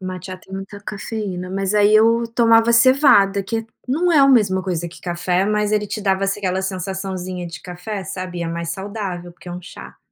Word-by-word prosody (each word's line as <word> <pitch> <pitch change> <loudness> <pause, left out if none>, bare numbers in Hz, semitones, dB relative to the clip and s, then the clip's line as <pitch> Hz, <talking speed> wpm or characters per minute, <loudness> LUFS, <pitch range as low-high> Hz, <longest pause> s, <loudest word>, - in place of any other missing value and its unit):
Mate 185 0 -6
já 185 - -5
tem 190 +1 -18
muita 195 +1 -7
cafeína. 200 -3 -5
Mas 195 +1 -1
aí 210 +1 +5
eu 230 +2 +5
tomava 230 -1 +5
cevada, 230 -6 +5
que 225 +4 -2
é 225 - -6 0.2
não 340 +7 +1
é 305 - +5
a 275 0 +6
mesma 200 -7 +3
coisa 175 -3 -2
que 170 - -14
café, 180 +1 0
mas 210 0 0
ele 210 -1 +1
te 215 - -4
dava 195 0 +1
aquela 190 -1 -1
sensaçãozinha 185 -1 -4
de 165 - -9
café, 185 +3 -6
sabe, 185 -1 -6
e - - -2
é - - -2
mais 170 0 -4
saudável, 190 -2 -5
porque 175 - -14
é - - -6
um 180 - -6
chá. 175 - -11
195 Hz, 215 wpm, -20 LUFS, 180-215 Hz, 0.2 s, a